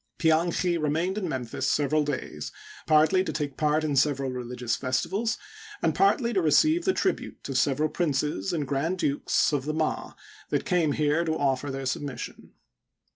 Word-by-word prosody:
Pianchi 170 Hz, +1 st, +2 dB
remained 165 Hz, +6 st, 0 dB
in 185 Hz, -5 st, -3 dB
Memphis 125 Hz, -5 st, -2 dB
several 150 Hz, +1 st, +2 dB
days, 145 Hz, -3 st, -4 dB, 0.4 s
partly 160 Hz, +5 st, +4 dB
to -, -, -3 dB
take 145 Hz, -3 st, -3 dB
part 150 Hz, 0 st, +1 dB
in 150 Hz, -2 st, 0 dB
several 135 Hz, -1 st, +2 dB
religious 125 Hz, -1 st, -3 dB
festivals 195 Hz, -, -1 dB, 0.4 s
and -, -, +1 dB
partly 260 Hz, -11 st, +2 dB
to 190 Hz, -, +2 dB
receive 310 Hz, -, +3 dB
the 380 Hz, -, +4 dB
tribute 380 Hz, -, -2 dB
of 135 Hz, -, -4 dB
several 145 Hz, +3 st, +2 dB
princes 150 Hz, -, -1 dB
and 150 Hz, -5 st, -2 dB
grand 145 Hz, +7 st, -1 dB
dukes 145 Hz, -1 st, +1 dB
of 140 Hz, -2 st, 0 dB
the 155 Hz, +1 st, -2 dB
Ma 160 Hz, -1 st, -2 dB, 0.4 s
that -, -, -1 dB
came 165 Hz, -5 st, +2 dB
here 150 Hz, +3 st, +1 dB
to 160 Hz, -1 st, -1 dB
offer 140 Hz, 0 st, 0 dB
their 135 Hz, 0 st, -4 dB
submission. 135 Hz, +1 st, -5 dB
150 Hz, 165 wpm, -27 LUFS, 135-170 Hz, 0.4 s, partly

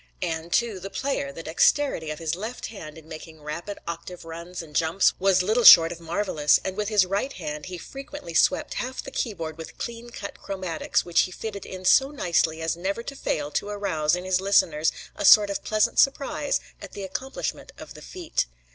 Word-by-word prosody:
And, 165 Hz, +1 st, -3 dB
too, 230 Hz, -3 st, +1 dB
the 195 Hz, -, -7 dB
player 265 Hz, -, -2 dB
the 165 Hz, +4 st, -9 dB
dexterity 165 Hz, -, +2 dB
of 155 Hz, -, -4 dB
his 160 Hz, -1 st, -2 dB
left 220 Hz, +8 st, -5 dB
hand 160 Hz, -6 st, -9 dB
in 160 Hz, -1 st, -14 dB
making 160 Hz, -1 st, -10 dB
rapid 170 Hz, +7 st, -5 dB
octave 170 Hz, +1 st, -7 dB
runs 170 Hz, +2 st, -7 dB
and 150 Hz, -2 st, -15 dB
jumps 165 Hz, +4 st, +3 dB
was 190 Hz, -1 st, +3 dB
little 220 Hz, +5 st, +1 dB
short 165 Hz, -5 st, +10 dB
of 170 Hz, -, -7 dB
marvelous; 165 Hz, -3 st, +2 dB
and 190 Hz, -, -3 dB
with 210 Hz, 0 st, -2 dB
his 210 Hz, -3 st, +4 dB
right 200 Hz, +9 st, -1 dB
hand 150 Hz, -3 st, -6 dB
he 180 Hz, -1 st, -6 dB
frequently 275 Hz, -, -9 dB
swept -, -, +2 dB
half 255 Hz, +1 st, -5 dB
the -, -, -8 dB
keyboard 165 Hz, -8 st, -4 dB
with 160 Hz, -, -9 dB
clean 235 Hz, 0 st, -6 dB
cut 200 Hz, -4 st, -8 dB
chromatics 185 Hz, -5 st, -2 dB
which 175 Hz, -1 st, +2 dB
he 185 Hz, -, -2 dB
fitted 200 Hz, +1 st, -6 dB
in 185 Hz, 0 st, -8 dB
so 270 Hz, +8 st, +5 dB
nicely 165 Hz, -, 0 dB
as 165 Hz, -, 0 dB
never 195 Hz, +6 st, -3 dB
to 275 Hz, -, -7 dB
fail 150 Hz, -, -2 dB
to 205 Hz, -, -2 dB
arouse 180 Hz, -7 st, 0 dB
in 180 Hz, -, -5 dB
his 185 Hz, 0 st, +1 dB
listeners 165 Hz, -6 st, +3 dB, 0.2 s
a -, -, -4 dB
sort 205 Hz, -1 st, +7 dB
of 200 Hz, -, -4 dB
pleasant 215 Hz, -1 st, +1 dB
surprise 285 Hz, +1 st, +2 dB, 0.2 s
at -, -, -10 dB
the 200 Hz, -, -6 dB
accomplishment 260 Hz, +8 st, -5 dB
of -, -, -10 dB
the -, -, -12 dB
feat. 350 Hz, -, -3 dB
185 Hz, 200 wpm, -25 LUFS, 165-210 Hz, 0.2 s, short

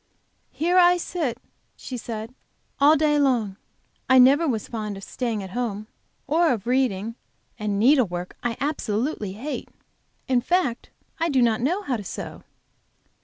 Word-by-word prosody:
"Here 350 Hz, +4 st, +2 dB
I 355 Hz, 0 st, +6 dB
sit," 320 Hz, -9 st, -3 dB, 0.4 s
she 255 Hz, -, -7 dB
said, 225 Hz, 0 st, -6 dB, 0.5 s
"all 290 Hz, +3 st, +6 dB
day 300 Hz, -1 st, +2 dB
long. 235 Hz, -8 st, +1 dB, 0.5 s
I 260 Hz, -, +7 dB
never 275 Hz, +6 st, +6 dB
was 225 Hz, -6 st, -1 dB
fond 215 Hz, -3 st, -4 dB
of 195 Hz, -, -10 dB
staying 230 Hz, -4 st, -3 dB
at 190 Hz, -, -8 dB
home, 215 Hz, -3 st, -3 dB, 0.4 s
or 325 Hz, +3 st, +3 dB
of 220 Hz, -4 st, -2 dB
reading, 230 Hz, -4 st, 0 dB, 0.5 s
and 210 Hz, -1 st, -1 dB
needlework 210 Hz, -8 st, +2 dB
I 240 Hz, -1 st, -2 dB
absolutely 240 Hz, -6 st, -2 dB
hate. 265 Hz, +9 st, -5 dB, 0.6 s
In 255 Hz, -2 st, +2 dB
fact, 310 Hz, -5 st, 0 dB, 0.3 s
I 335 Hz, +1 st, +1 dB
do 270 Hz, -4 st, +2 dB
not 225 Hz, -2 st, +2 dB
know 355 Hz, +11 st, 0 dB
how 255 Hz, -8 st, -1 dB
to 210 Hz, -, -7 dB
sew." -, -, -7 dB
245 Hz, 150 wpm, -24 LUFS, 215-295 Hz, 0.6 s, I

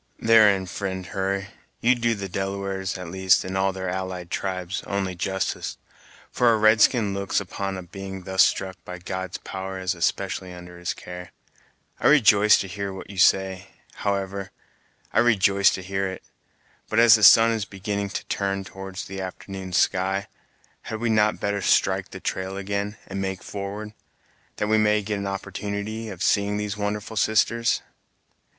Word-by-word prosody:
"Therein, 105 Hz, -4 st, +5 dB
fri'nd 95 Hz, 0 st, -4 dB
Hurry, 100 Hz, +1 st, -1 dB, 0.3 s
you 120 Hz, +2 st, +4 dB
do 115 Hz, -2 st, 0 dB
the 100 Hz, -1 st, -5 dB
Delawares, 95 Hz, 0 st, -3 dB
at 90 Hz, -2 st, -7 dB
least, 95 Hz, 0 st, +3 dB
and 95 Hz, +1 st, -4 dB
all 95 Hz, 0 st, +2 dB
their 95 Hz, 0 st, -5 dB
allied 90 Hz, -1 st, -4 dB
tribes, 95 Hz, -1 st, -3 dB
only 100 Hz, -2 st, -1 dB
justice, 95 Hz, +2 st, -3 dB, 0.5 s
for 120 Hz, -1 st, +4 dB
a 110 Hz, -, +3 dB
red 110 Hz, 0 st, +5 dB
skin 105 Hz, -6 st, +4 dB
looks 100 Hz, 0 st, 0 dB
upon 95 Hz, 0 st, -4 dB
a 95 Hz, -, -6 dB
being 95 Hz, +1 st, -8 dB
thus 95 Hz, +1 st, +4 dB
struck 95 Hz, -1 st, -1 dB
by 90 Hz, -, -7 dB
God's 95 Hz, 0 st, -5 dB
power 95 Hz, 0 st, -6 dB
as 95 Hz, 0 st, -1 dB
especially 95 Hz, +1 st, -2 dB
under 90 Hz, 0 st, -11 dB
his 90 Hz, -, -3 dB
care. 90 Hz, 0 st, -9 dB, 0.7 s
I -, -, +2 dB
rejoice 105 Hz, -7 st, +6 dB
to 95 Hz, -, -5 dB
hear 100 Hz, +1 st, -4 dB
what 95 Hz, +1 st, -9 dB
you 95 Hz, -, -7 dB
say, 95 Hz, 0 st, +3 dB, 0.3 s
however, 100 Hz, -1 st, -2 dB, 0.6 s
I -, -, +4 dB
rejoice 100 Hz, -4 st, +4 dB
to 95 Hz, -, -7 dB
hear 95 Hz, +1 st, -1 dB
it; 95 Hz, 0 st, -7 dB, 0.7 s
but 110 Hz, -, -1 dB
as 115 Hz, -1 st, +8 dB
the 110 Hz, -, +5 dB
sun 115 Hz, +3 st, +8 dB
is 110 Hz, -3 st, -1 dB
beginning 100 Hz, +1 st, -3 dB
to -, -, -5 dB
turn 100 Hz, 0 st, -2 dB
towards 95 Hz, 0 st, -7 dB
the 95 Hz, 0 st, -6 dB
afternoon's 95 Hz, 0 st, -5 dB
sky, 95 Hz, +2 st, +1 dB, 0.6 s
had 110 Hz, -, -6 dB
we 115 Hz, 0 st, 0 dB
not 105 Hz, -1 st, +3 dB
better 100 Hz, 0 st, -1 dB
strike -, -, +2 dB
the -, -, -8 dB
trail 95 Hz, +1 st, -3 dB
again, 100 Hz, +2 st, -3 dB
and 95 Hz, 0 st, -5 dB
make 95 Hz, -1 st, -3 dB
forward, 105 Hz, +2 st, -6 dB, 0.6 s
that -, -, -1 dB
we 110 Hz, +1 st, +3 dB
may 105 Hz, 0 st, +3 dB
get 105 Hz, 0 st, -2 dB
an 100 Hz, -, -3 dB
opportunity 100 Hz, +3 st, -4 dB
of 95 Hz, -1 st, -5 dB
seeing 100 Hz, 0 st, +2 dB
these 105 Hz, 0 st, -3 dB
wonderful 105 Hz, +1 st, -3 dB
sisters?" 115 Hz, +2 st, +2 dB
95 Hz, 170 wpm, -24 LUFS, 95-105 Hz, 0.7 s, as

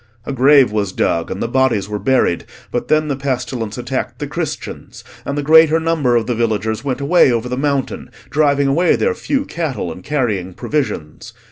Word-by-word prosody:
A 140 Hz, -, -4 dB
grave 135 Hz, -1 st, +5 dB
was 105 Hz, -3 st, -1 dB
dug, 85 Hz, -2 st, 0 dB
and 95 Hz, -, -3 dB
the -, -, -1 dB
bodies 120 Hz, -5 st, +1 dB
were 105 Hz, 0 st, -4 dB
buried; 105 Hz, -5 st, +1 dB, 0.3 s
but 120 Hz, -, -2 dB
then 155 Hz, 0 st, +2 dB
the 140 Hz, -, -1 dB
pestilence 125 Hz, -5 st, -3 dB
attacked 125 Hz, +1 st, -3 dB
the -, -, -4 dB
Christians, -, -, -6 dB, 0.2 s
and 140 Hz, -, -3 dB
the 145 Hz, -, -1 dB
greater 160 Hz, +1 st, +6 dB
number 160 Hz, -7 st, +1 dB
of 115 Hz, -1 st, +2 dB
the 125 Hz, -, -1 dB
villagers 110 Hz, -1 st, -1 dB
went 135 Hz, -2 st, -2 dB
away 145 Hz, -1 st, +4 dB
over 120 Hz, 0 st, -1 dB
the 125 Hz, -, -3 dB
mountain, 140 Hz, 0 st, -2 dB, 0.2 s
driving 145 Hz, -2 st, +2 dB
away 165 Hz, +6 st, +3 dB
their 470 Hz, -, +1 dB
few 285 Hz, -9 st, -2 dB
cattle, 140 Hz, -, -3 dB
and 90 Hz, +3 st, -10 dB
carrying 105 Hz, -11 st, -2 dB
provisions. 130 Hz, -, -4 dB
130 Hz, 190 wpm, -18 LUFS, 110-145 Hz, 0.3 s, greater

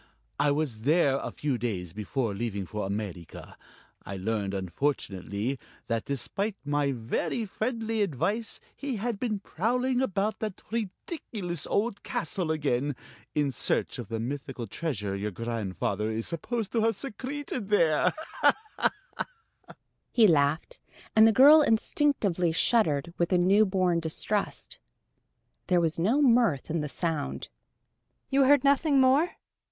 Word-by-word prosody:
I 145 Hz, -, +3 dB
was 145 Hz, -6 st, -1 dB
there 140 Hz, +1 st, +3 dB
a -, -, -4 dB
few 140 Hz, -5 st, -2 dB
days 95 Hz, -8 st, -3 dB
before 110 Hz, +2 st, -2 dB
leaving 100 Hz, -2 st, -3 dB
for 105 Hz, +2 st, -4 dB
America. 100 Hz, -5 st, -6 dB, 0.5 s
I 100 Hz, -, -6 dB
learned, 100 Hz, 0 st, -2 dB
unfortunately, 100 Hz, -, -2 dB, 0.3 s
that 115 Hz, -1 st, -2 dB
despite 190 Hz, -, -2 dB
my 145 Hz, -1 st, +1 dB
very 125 Hz, -, -2 dB
friendly 225 Hz, +1 st, -2 dB
advice, 205 Hz, -, -1 dB, 0.2 s
he 280 Hz, -3 st, -3 dB
had 225 Hz, 0 st, -2 dB
been 215 Hz, -5 st, -2 dB
prowling 250 Hz, +8 st, 0 dB
about 210 Hz, -2 st, 0 dB
that 215 Hz, -4 st, -5 dB
ridiculous 205 Hz, -, -4 dB
old 205 Hz, 0 st, 0 dB
castle 200 Hz, -8 st, -3 dB
again, 145 Hz, -3 st, 0 dB, 0.4 s
in 145 Hz, -2 st, +2 dB
search 125 Hz, -, -1 dB
of 120 Hz, -, -5 dB
the 115 Hz, +1 st, -3 dB
mythical 130 Hz, 0 st, -4 dB
treasure 105 Hz, -, -3 dB
your 100 Hz, +2 st, -2 dB
grandfather 105 Hz, -1 st, -2 dB
is 110 Hz, +1 st, -2 dB
supposed 220 Hz, +6 st, -3 dB
to 230 Hz, -, +1 dB
have 225 Hz, 0 st, +2 dB
secreted 260 Hz, -1 st, -5 dB
there." 165 Hz, -7 st, +4 dB, 2.0 s
He 230 Hz, -, +5 dB
laughed, 155 Hz, -, +2 dB, 0.4 s
and 220 Hz, 0 st, +8 dB
the -, -, +6 dB
girl 290 Hz, +7 st, +8 dB
instinctively 220 Hz, -, +2 dB
shuddered 165 Hz, -, +2 dB
with 170 Hz, +1 st, +1 dB
a 180 Hz, -, +4 dB
newborn 185 Hz, -1 st, +3 dB
distrust. 170 Hz, +5 st, -2 dB, 0.9 s
There 180 Hz, -1 st, +4 dB
was 165 Hz, -1 st, 0 dB
no 235 Hz, -, +3 dB
mirth 230 Hz, -, +3 dB
in 165 Hz, -1 st, 0 dB
the 150 Hz, -, -3 dB
sound. 160 Hz, -1 st, -3 dB, 0.8 s
"You 270 Hz, 0 st, +5 dB
heard 285 Hz, 0 st, +5 dB
nothing 280 Hz, 0 st, +4 dB
more? 270 Hz, +7 st, +4 dB
170 Hz, 130 wpm, -28 LUFS, -, 2.0 s, and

